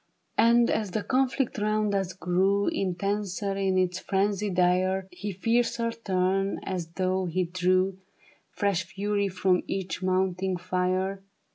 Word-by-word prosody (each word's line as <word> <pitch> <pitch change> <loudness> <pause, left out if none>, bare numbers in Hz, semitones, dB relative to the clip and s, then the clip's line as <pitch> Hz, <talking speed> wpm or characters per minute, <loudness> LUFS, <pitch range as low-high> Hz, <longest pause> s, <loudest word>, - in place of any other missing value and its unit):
And 235 +1 +5
as 215 -2 0
the 205 +3 -2
conflict 260 -2 0
round 215 0 +1
us 195 -2 -1
grew 190 +3 +1
Intenser 195 +1 -2
in 195 -1 +1
its 185 -1 +1
frenzy 200 +2 0
dire, 185 +1 +2
He 200 +3 -5
fiercer 230 +4 0
turned 195 -2 0
as 180 -3 -3
though 185 0 0
he 180 +2 0
drew 185 +2 +1 0.5
Fresh 200 -3 0
fury 200 +1 -1
from 185 -1 +1
each 185 -2 -3
mounting 185 0 0
fire. 185 +2 -1
190 Hz, 130 wpm, -27 LUFS, 185-205 Hz, 0.5 s, And